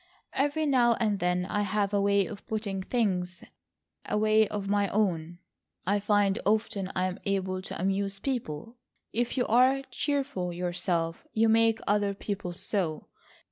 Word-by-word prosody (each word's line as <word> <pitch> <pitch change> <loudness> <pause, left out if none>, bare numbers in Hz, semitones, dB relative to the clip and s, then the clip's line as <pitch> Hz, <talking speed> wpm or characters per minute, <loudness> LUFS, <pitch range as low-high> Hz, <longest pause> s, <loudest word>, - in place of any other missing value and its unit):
"Every 290 +3 +1
now 245 -5 +4
and 210 -4 0
then 180 0 +1
I 205 +2 -1
have 205 0 0
a 200 - +3
way 200 -1 +3
of 210 -3 -8
putting 210 -3 -2
things,—a 190 -2 -4
way 215 0 +4
of 205 -1 -4
my 205 0 +2
own. 175 -5 0 0.5
I 200 +3 +2
find 205 -1 +2
often 205 -2 0
I 185 - +1
am 185 0 -3
able 190 -1 -1
to - - -7
amuse 195 +2 0
people, 210 - -3 0.5
but 225 - -1
if 240 +2 -1
you 245 - +2
are 255 +4 +4
cheerful 275 -9 -1
yourself, 175 -1 -2
you 225 +1 +3
make 225 0 +4
other 205 -1 +1
people 200 -3 -4
so. 175 -3 -2
200 Hz, 155 wpm, -28 LUFS, 185-225 Hz, 0.5 s, now